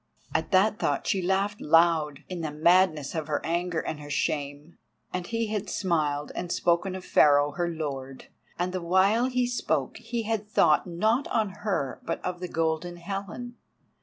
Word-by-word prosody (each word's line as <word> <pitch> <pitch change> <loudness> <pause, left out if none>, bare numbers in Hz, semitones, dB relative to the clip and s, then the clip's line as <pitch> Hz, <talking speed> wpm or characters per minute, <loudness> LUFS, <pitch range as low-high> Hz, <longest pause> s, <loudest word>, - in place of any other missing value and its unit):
At 160 0 0
that 200 +3 +3
thought 145 - 0
she 195 - +1
laughed 195 +3 0
out, 160 -2 +3
in 180 -2 -5
the 160 - -2
madness 155 -1 +3
of 160 -2 -3
her 150 -2 0
anger 170 0 -1
and 155 - -4
her 145 0 -9
shame. 145 +2 -3 0.3
And 180 -1 -3
he 230 -1 -1
had 210 -1 -2
smiled 150 -6 0
and 175 -1 -4
spoken 175 +3 +1
of 185 - -7
Pharaoh 145 0 +5
her 175 +4 -1
lord—and 150 +3 -6
the 185 - -2
while 190 +8 +3
he 250 -1 +1
spoke 245 0 -1
he 230 0 -4
had 215 -1 -2
thought 210 - +3
not 215 +10 +1
on 220 -3 0
her 190 -8 -3
but 165 - -3
of 180 -1 -3
the 180 - -4
Golden 165 +1 -1
Helen. 200 +7 -6
175 Hz, 170 wpm, -27 LUFS, 155-200 Hz, 0.3 s, Pharaoh